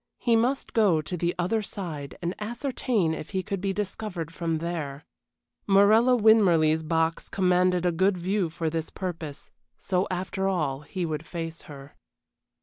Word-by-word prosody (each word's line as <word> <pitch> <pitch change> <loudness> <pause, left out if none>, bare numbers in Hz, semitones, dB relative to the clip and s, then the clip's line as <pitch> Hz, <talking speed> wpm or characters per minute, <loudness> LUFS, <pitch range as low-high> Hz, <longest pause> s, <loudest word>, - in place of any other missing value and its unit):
He 235 -2 +2
must 245 +4 0
go 200 -8 +4
to 155 +4 -4
the 175 0 -1
other 185 +6 0
side 160 -9 -6
and 175 +1 -1
ascertain 230 - -1
if 155 - -6
she 190 -1 -2
could 195 0 -4
be 195 0 0
discovered 190 -4 -4
from 165 0 -1
there. 155 -4 -4 0.6
Morella 215 +5 +5
Winmarleigh's 180 -9 +5
box 160 +1 0
commanded 180 -1 +2
a 175 - +3
good 190 +3 +2
view 185 0 0
for 165 0 -3
this 160 0 -2
purpose, 165 -6 -6 0.3
so 185 0 0
after 190 +1 -2
all 150 -8 0
he 175 +4 -4
would 155 -2 -3
face 165 -1 -5
her. 140 0 -11
180 Hz, 155 wpm, -26 LUFS, 160-200 Hz, 0.6 s, Morella